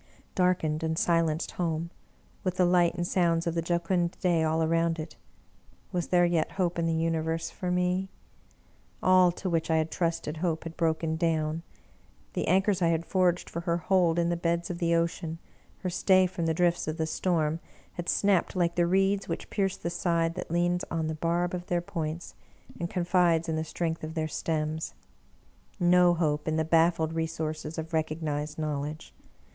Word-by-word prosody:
Darkened 175 Hz, -4 st, +1 dB
and 160 Hz, 0 st, -1 dB
silenced 165 Hz, -2 st, +1 dB
home, 170 Hz, -1 st, -2 dB, 0.5 s
with 185 Hz, -1 st, -2 dB
the 180 Hz, -, +4 dB
light 175 Hz, -1 st, +3 dB
and 175 Hz, -1 st, -2 dB
sounds 170 Hz, -2 st, +1 dB
of 170 Hz, -, 0 dB
the 165 Hz, -, 0 dB
jocund 170 Hz, +1 st, 0 dB
day 175 Hz, -3 st, +2 dB
all 160 Hz, 0 st, +1 dB
around 165 Hz, +1 st, +1 dB
it. 155 Hz, -1 st, -7 dB, 0.8 s
Was 175 Hz, -1 st, -1 dB
there 175 Hz, -1 st, +4 dB
yet 170 Hz, -2 st, 0 dB
hope 175 Hz, -3 st, 0 dB
in 165 Hz, -, +1 dB
the 165 Hz, -, +1 dB
Universe 165 Hz, 0 st, -1 dB
for 180 Hz, -, -4 dB
me? 180 Hz, +1 st, 0 dB, 0.9 s
All 185 Hz, -1 st, +6 dB
to 190 Hz, -, -5 dB
which 165 Hz, -2 st, 0 dB
I 160 Hz, -, +3 dB
had 160 Hz, 0 st, 0 dB
trusted 165 Hz, -2 st, -1 dB
Hope 165 Hz, -1 st, -1 dB
had 165 Hz, 0 st, -7 dB
broken 160 Hz, -1 st, 0 dB
down; 160 Hz, -1 st, 0 dB, 0.7 s
the -, -, -2 dB
anchors 190 Hz, +2 st, +2 dB
I 170 Hz, -, +4 dB
had 165 Hz, 0 st, +1 dB
forged 180 Hz, -2 st, +1 dB
for 170 Hz, -, -5 dB
her 170 Hz, 0 st, 0 dB
hold 175 Hz, -1 st, +2 dB
in 170 Hz, 0 st, +2 dB
the 175 Hz, -, +1 dB
beds 170 Hz, +1 st, -1 dB
of 170 Hz, -, -5 dB
the 170 Hz, -1 st, +2 dB
ocean, 165 Hz, -1 st, -1 dB, 0.5 s
her 185 Hz, -, 0 dB
stay 185 Hz, +1 st, +4 dB
from 175 Hz, -2 st, -2 dB
the 160 Hz, -, +1 dB
drifts 175 Hz, -1 st, +1 dB
of 155 Hz, +1 st, -2 dB
the 160 Hz, -, 0 dB
storm, 160 Hz, -1 st, 0 dB, 0.3 s
had 175 Hz, -1 st, -4 dB
snapped 200 Hz, -3 st, +2 dB
Hke 170 Hz, -2 st, +1 dB
the 175 Hz, 0 st, +2 dB
reeds 195 Hz, +2 st, +2 dB
which -, -, -4 dB
pierce 195 Hz, -3 st, 0 dB
the 170 Hz, -, -4 dB
side 165 Hz, -2 st, 0 dB
that -, -, -6 dB
leans 175 Hz, +1 st, +1 dB
on 165 Hz, -1 st, -1 dB
the -, -, -2 dB
barb 170 Hz, +3 st, 0 dB
of 180 Hz, 0 st, -4 dB
their 175 Hz, -, +1 dB
points, 165 Hz, -1 st, -5 dB, 0.5 s
and 170 Hz, -, -2 dB
confides 175 Hz, -2 st, +2 dB
in 160 Hz, -, -1 dB
the 160 Hz, -, -1 dB
strength 160 Hz, +1 st, -3 dB
of 160 Hz, +1 st, -5 dB
their 160 Hz, -1 st, -1 dB
stems. 155 Hz, 0 st, -2 dB, 0.8 s
No 175 Hz, 0 st, +5 dB
hope 150 Hz, -3 st, 0 dB
in 155 Hz, -, +1 dB
the 160 Hz, 0 st, +1 dB
baffled 165 Hz, 0 st, +3 dB
resources 160 Hz, -1 st, -3 dB
of 160 Hz, +1 st, -5 dB
recognized 155 Hz, -1 st, -2 dB
knowledge 150 Hz, 0 st, -4 dB
170 Hz, 185 wpm, -28 LUFS, 160-175 Hz, 0.9 s, All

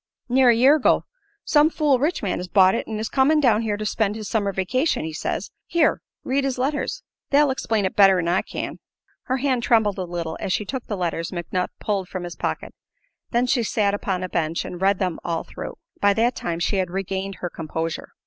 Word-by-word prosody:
"Near 255 Hz, 0 st, +5 dB
a 235 Hz, -, +6 dB
year 265 Hz, +6 st, +6 dB
ago. 285 Hz, -, +3 dB, 0.4 s
Some 300 Hz, +1 st, +5 dB
fool 295 Hz, -5 st, +2 dB
rich 300 Hz, +2 st, 0 dB
man 195 Hz, -, -1 dB
has 180 Hz, -, -5 dB
bought 190 Hz, 0 st, +5 dB
it -, -, -2 dB
and 220 Hz, -1 st, -4 dB
is 220 Hz, -, -2 dB
comin' 280 Hz, +5 st, +3 dB
down 230 Hz, -6 st, +3 dB
here 215 Hz, -2 st, -1 dB
to 215 Hz, -, -4 dB
spend 210 Hz, -1 st, 0 dB
his 215 Hz, -2 st, -6 dB
summer 205 Hz, -2 st, 0 dB
vacation, 220 Hz, -, 0 dB
he 160 Hz, -, -5 dB
says. -, -, -3 dB, 0.2 s
Here, 335 Hz, -2 st, +2 dB, 0.2 s
read 270 Hz, +2 st, 0 dB
his 270 Hz, -2 st, -1 dB
letters. 290 Hz, -, -2 dB, 0.3 s
They'll 290 Hz, 0 st, +4 dB
explain 220 Hz, -5 st, 0 dB
it 190 Hz, -, -2 dB
better 195 Hz, -2 st, +6 dB
'n 170 Hz, -2 st, -1 dB
I 175 Hz, +2 st, +2 dB
can." -, -, -6 dB, 0.5 s
Her 260 Hz, -, 0 dB
hand 260 Hz, -2 st, 0 dB
trembled 220 Hz, -4 st, +2 dB
a -, -, -1 dB
little 170 Hz, -2 st, -4 dB
as 185 Hz, -, -1 dB
she 210 Hz, +5 st, -1 dB
took 260 Hz, +3 st, -5 dB
the 205 Hz, -, -3 dB
letters 170 Hz, -2 st, -2 dB
McNutt 180 Hz, +1 st, -2 dB
pulled 195 Hz, -3 st, -2 dB
from 185 Hz, -2 st, -5 dB
his 175 Hz, -1 st, -6 dB
pocket. -, -, -4 dB, 0.6 s
Then 240 Hz, +1 st, +2 dB
she 250 Hz, 0 st, +2 dB
sat 210 Hz, -2 st, +1 dB
upon 190 Hz, -2 st, -2 dB
a -, -, -2 dB
bench 165 Hz, -1 st, -1 dB
and 180 Hz, -, -7 dB
read 195 Hz, 0 st, +3 dB
them 185 Hz, -3 st, -2 dB
all 165 Hz, -1 st, -2 dB
through. -, -, -8 dB, 0.2 s
By 200 Hz, 0 st, +3 dB
that 235 Hz, +2 st, +2 dB
time 170 Hz, -1 st, -3 dB
she 195 Hz, +4 st, 0 dB
had 185 Hz, -2 st, 0 dB
regained 195 Hz, +1 st, -3 dB
her 175 Hz, -, -5 dB
composure. 160 Hz, 0 st, -4 dB
205 Hz, 225 wpm, -23 LUFS, 185-255 Hz, 0.6 s, a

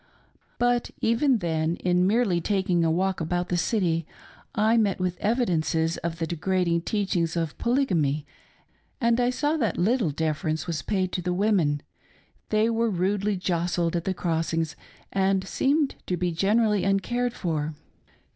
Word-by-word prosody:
But 245 Hz, 0 st, +1 dB
even 240 Hz, +3 st, +3 dB
then, 165 Hz, -3 st, -1 dB
in 180 Hz, 0 st, +1 dB
merely 205 Hz, -5 st, +2 dB
taking 185 Hz, -3 st, +1 dB
a 165 Hz, -, +2 dB
walk 185 Hz, +2 st, 0 dB
about 175 Hz, +2 st, -1 dB
the 180 Hz, -, 0 dB
city, 170 Hz, -3 st, 0 dB, 0.5 s
I 215 Hz, +2 st, +3 dB
met 210 Hz, -5 st, +2 dB
with 180 Hz, -1 st, -1 dB
evidences 170 Hz, -8 st, +1 dB
of 170 Hz, -1 st, -4 dB
the 165 Hz, -, -1 dB
degrading 170 Hz, +1 st, 0 dB
teachings 175 Hz, -4 st, -1 dB
of 165 Hz, -3 st, -2 dB
Polygamy 170 Hz, -, +1 dB, 0.4 s
— -, -, -41 dB
I 240 Hz, 0 st, +2 dB
saw 295 Hz, +5 st, 0 dB
that 225 Hz, -, 0 dB
little 215 Hz, 0 st, +2 dB
defer 155 Hz, +3 st, -2 dB
ence 155 Hz, +1 st, -1 dB
was 170 Hz, -3 st, -3 dB
paid 185 Hz, -3 st, -1 dB
to 180 Hz, -, -2 dB
the 180 Hz, 0 st, -1 dB
women, 180 Hz, -8 st, +1 dB, 0.7 s
they 215 Hz, +1 st, +3 dB
were 230 Hz, 0 st, +1 dB
rudely 200 Hz, +2 st, 0 dB
jostled 175 Hz, -1 st, 0 dB
at 170 Hz, -, -2 dB
the 190 Hz, -, -1 dB
crossings, 165 Hz, -2 st, -1 dB, 0.4 s
and 195 Hz, 0 st, +1 dB
seemed 285 Hz, +5 st, +1 dB
to 180 Hz, -, -1 dB
be 180 Hz, 0 st, 0 dB
generally 210 Hz, +4 st, +2 dB
uncared 240 Hz, +5 st, 0 dB
for. 155 Hz, -3 st, -2 dB
185 Hz, 155 wpm, -26 LUFS, 165-215 Hz, 0.7 s, even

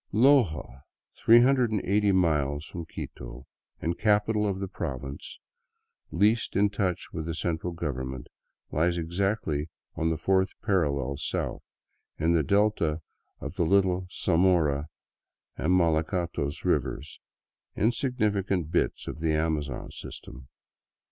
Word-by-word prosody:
Loja, 110 Hz, -, +3 dB, 0.4 s
380 110 Hz, -5 st, +4 dB
miles 75 Hz, -5 st, +1 dB
from 85 Hz, -2 st, -7 dB
Quito -, -, -8 dB, 0.3 s
and 85 Hz, +1 st, -2 dB
capital 105 Hz, 0 st, +2 dB
of 95 Hz, -1 st, -2 dB
the 95 Hz, -, -3 dB
province 70 Hz, -4 st, -6 dB, 0.7 s
least 105 Hz, +6 st, +2 dB
in 100 Hz, +1 st, +3 dB
touch 100 Hz, -4 st, -2 dB
with 80 Hz, -1 st, -4 dB
the 80 Hz, -, -3 dB
central 85 Hz, +1 st, -2 dB
government, 65 Hz, -6 st, -4 dB, 0.5 s
lies 85 Hz, +4 st, +1 dB
exactly 85 Hz, -3 st, -1 dB, 0.2 s
on 80 Hz, -, 0 dB
the 80 Hz, -, 0 dB
fourth 95 Hz, +3 st, +1 dB
parallel 70 Hz, -, 0 dB
south, -, -, -3 dB, 0.6 s
in 80 Hz, +2 st, +2 dB
the 85 Hz, -, +4 dB
delta 100 Hz, -5 st, +1 dB, 0.4 s
of -, -, -7 dB
the -, -, +2 dB
little 95 Hz, 0 st, +2 dB
Zamora 80 Hz, -5 st, +2 dB, 0.7 s
and 80 Hz, -, 0 dB
Malacatos 80 Hz, -3 st, 0 dB
rivers, 75 Hz, +1 st, -1 dB, 0.6 s
insignifi 110 Hz, -4 st, +1 dB
cant 85 Hz, -5 st, -1 dB
bits -, -, 0 dB
of -, -, -5 dB
the 80 Hz, -1 st, +1 dB
Amazon 75 Hz, -4 st, -2 dB
system. 65 Hz, 0 st, -10 dB
85 Hz, 115 wpm, -27 LUFS, 75-100 Hz, 0.7 s, 380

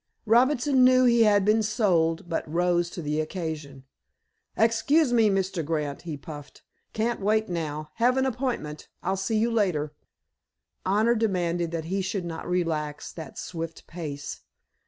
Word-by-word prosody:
Robinson 255 Hz, +3 st, +4 dB
knew 255 Hz, 0 st, +6 dB
he 235 Hz, -2 st, +5 dB
had 205 Hz, -2 st, +4 dB
been 215 Hz, +1 st, +4 dB
"sold," 175 Hz, -7 st, +1 dB
but 165 Hz, -2 st, -3 dB
rose 175 Hz, 0 st, +1 dB
to 175 Hz, -, -7 dB
the 150 Hz, +1 st, 0 dB
occasion. 155 Hz, -5 st, -5 dB, 0.7 s
"Excuse 245 Hz, +5 st, +3 dB
me, 225 Hz, -3 st, +5 dB
Mr. 190 Hz, -3 st, 0 dB
Grant," 150 Hz, -2 st, -2 dB
he 160 Hz, -4 st, -6 dB
puffed. 145 Hz, 0 st, -10 dB, 0.3 s
"Can't 230 Hz, +2 st, -1 dB
wait 215 Hz, +2 st, +1 dB
now. 155 Hz, -3 st, -4 dB
Have 245 Hz, +3 st, +3 dB
an 265 Hz, -, +2 dB
appointment. 240 Hz, -, -3 dB, 0.2 s
I'll 190 Hz, +2 st, 0 dB
see 195 Hz, +3 st, -1 dB
you 230 Hz, +2 st, +2 dB
later." 175 Hz, -10 st, 0 dB, 0.9 s
Honor 215 Hz, +5 st, +3 dB
demanded 175 Hz, -6 st, 0 dB
that 165 Hz, -1 st, -4 dB
he 190 Hz, +4 st, -1 dB
should 190 Hz, -1 st, -3 dB
not 165 Hz, 0 st, -6 dB
relax 155 Hz, -4 st, -2 dB
that 160 Hz, -4 st, -9 dB
swift 165 Hz, -1 st, -6 dB
pace. 150 Hz, -5 st, -6 dB
180 Hz, 150 wpm, -26 LUFS, 160-225 Hz, 0.9 s, knew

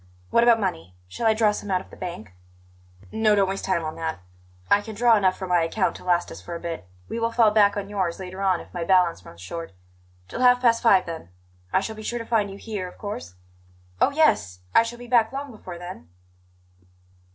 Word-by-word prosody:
What 235 Hz, -, +5 dB
about 235 Hz, -1 st, +5 dB
money? 90 Hz, -, -3 dB
Shall 225 Hz, -, -2 dB
I 220 Hz, -, +4 dB
draw 215 Hz, -1 st, +4 dB
some 205 Hz, -, -6 dB
out 185 Hz, -1 st, +2 dB
of 190 Hz, -, -14 dB
the -, -, -11 dB
bank?" 110 Hz, -, -7 dB, 0.8 s
"No; 220 Hz, -1 st, +3 dB
don't 200 Hz, -1 st, +3 dB
waste 195 Hz, +1 st, -3 dB
time 170 Hz, -4 st, 0 dB
on 155 Hz, -, -3 dB
that; 160 Hz, -1 st, -3 dB, 0.5 s
I 205 Hz, -, +4 dB
can 220 Hz, +1 st, -8 dB
draw 235 Hz, +1 st, +5 dB
enough 190 Hz, -3 st, +2 dB
from 190 Hz, -2 st, -6 dB
my 175 Hz, -1 st, +4 dB
account 185 Hz, +4 st, 0 dB
to -, -, -14 dB
last 175 Hz, -1 st, +1 dB
us -, -, -9 dB
for 170 Hz, -, -7 dB
a -, -, -5 dB
bit. 165 Hz, -, -6 dB, 0.2 s
We 230 Hz, -, -4 dB
will 230 Hz, 0 st, 0 dB
fall 230 Hz, -2 st, +4 dB
back 205 Hz, -1 st, +4 dB
on 200 Hz, -1 st, -3 dB
yours 190 Hz, -4 st, -2 dB
later 185 Hz, +1 st, -7 dB
on 190 Hz, -3 st, +2 dB
if -, -, -15 dB
my 175 Hz, -2 st, -3 dB
balance 175 Hz, -, +3 dB
runs 85 Hz, -1 st, -13 dB
short. 165 Hz, -, -7 dB, 0.5 s
Till 250 Hz, -, -5 dB
half 250 Hz, 0 st, +6 dB
past 235 Hz, -2 st, +3 dB
five, 195 Hz, -5 st, +5 dB
then; 165 Hz, -, -7 dB, 0.4 s
I -, -, +3 dB
shall 220 Hz, +2 st, -5 dB
be 215 Hz, -, -9 dB
sure 240 Hz, +2 st, -3 dB
to 230 Hz, -, -5 dB
find 220 Hz, -3 st, +1 dB
you 195 Hz, -, -9 dB
here, 205 Hz, -4 st, -5 dB
of 180 Hz, -, -13 dB
course?" 90 Hz, -, -6 dB, 0.7 s
"Oh, -, -, +5 dB
yes! 105 Hz, -, +2 dB
I -, -, +7 dB
shall 230 Hz, +1 st, -5 dB
be 245 Hz, -, -10 dB
back 235 Hz, -2 st, +3 dB
long 275 Hz, 0 st, -5 dB
before 185 Hz, -5 st, -9 dB
then." 175 Hz, -, -9 dB
195 Hz, 230 wpm, -24 LUFS, 170-225 Hz, 0.8 s, I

